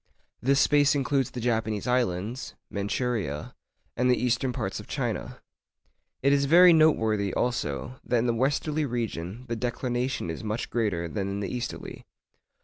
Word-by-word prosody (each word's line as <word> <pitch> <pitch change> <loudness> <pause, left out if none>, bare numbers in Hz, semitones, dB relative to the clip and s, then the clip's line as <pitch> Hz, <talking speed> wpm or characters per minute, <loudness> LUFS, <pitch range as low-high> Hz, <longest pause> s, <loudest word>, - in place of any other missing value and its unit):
This 135 +3 +3
space 145 -1 +4
includes 135 -2 +1
the 125 - -6
Japanese 110 -3 -1
Islands, 120 -1 -1 0.2
Manchouria, 100 - -2 0.4
and 125 +1 +2
the 125 - +4
eastern 125 +1 +1
parts - - -3
of - - -10
China. - - -3 0.8
It 140 +1 +5
is 140 0 +3
very 175 +4 +8
noteworthy 110 - +3
also, 120 - -2
that 120 - +1
in 115 - +1
the 120 - +2
westerly 145 +5 0
region 115 -2 -4
the 115 - -2
declination 120 -3 -2
is 80 - -7
much 110 +2 -3
greater 100 -8 0
than 100 +3 -3
in 100 +1 -3
the 100 +4 -3
easterly. 120 -1 -6
120 Hz, 150 wpm, -27 LUFS, 105-130 Hz, 0.8 s, very